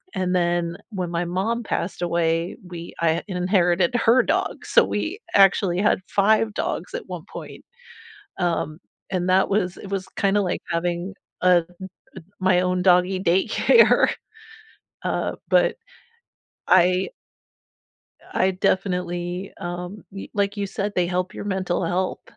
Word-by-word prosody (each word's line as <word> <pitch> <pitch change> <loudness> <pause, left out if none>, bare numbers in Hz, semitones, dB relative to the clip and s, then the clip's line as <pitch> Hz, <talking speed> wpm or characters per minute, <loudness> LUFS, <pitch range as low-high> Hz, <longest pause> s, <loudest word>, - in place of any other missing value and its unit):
And 185 -1 0
then 175 -1 0 0.2
when 180 -4 -3
my 170 +1 -1
mom 210 +7 -1
passed 180 -3 -3
away, 170 0 0
we 170 -1 -8
I 165 0 +1
inherited 180 +1 +2
her 240 +2 +5
dog, - - -1
so - - +5
we 375 +7 -3 0.2
actually 195 -2 +4
had 205 -2 +2
5 215 +2 +2
dogs - - -3
at - - -5
one - - -6
point, - - -9 0.8
um, 165 -2 -1 0.3
and 185 -1 -1
that 190 +1 +4
was 185 -3 0
it 200 - -9
was 190 -1 -3
kinda 200 +1 +2
like 180 - -2
having, 175 +3 -2 0.3
uh, 180 -2 +5
m 180 - -22 0.4
m 170 - -13 0.2
my 185 -1 +3
own 180 0 0
doggy 185 0 +4
daycare. 190 - +4 1.0
Uh, - - -1
but - - +3 0.9
I 185 +1 +4 1.2
I 190 0 +2
definitely, 180 -1 -1
um, 180 +3 -6
y 195 - -8
like 200 0 0
you 200 -1 -2
said, 200 +1 -3
they 180 -1 +2
help 180 +2 -2
your - - -6
mental 185 -3 -1
health. 180 +2 -1
185 Hz, 140 wpm, -23 LUFS, 175-195 Hz, 1.2 s, her